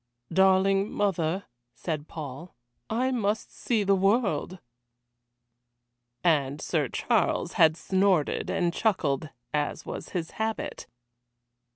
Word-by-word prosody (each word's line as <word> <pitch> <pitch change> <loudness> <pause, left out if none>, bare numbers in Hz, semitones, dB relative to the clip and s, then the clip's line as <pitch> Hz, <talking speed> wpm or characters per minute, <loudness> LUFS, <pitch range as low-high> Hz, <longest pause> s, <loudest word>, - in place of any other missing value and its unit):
"Darling 195 +1 +4
mother," 190 -2 0 0.3
said 155 -3 -4
Paul, 155 +2 -8 0.3
"I 250 +4 +1
must 215 -3 -1
see 225 -4 0
the 200 0 +3
world." 195 - +1 1.7
And 145 -4 +2
Sir - - 0
Charles - - 0
had 160 0 +5
snorted 190 -5 +1
and 175 -2 0
chuckled, 155 - 0 0.2
as 150 -1 -1
was - - -6
his 170 -3 -3
habit. 220 0 -3
185 Hz, 100 wpm, -27 LUFS, 155-200 Hz, 1.7 s, had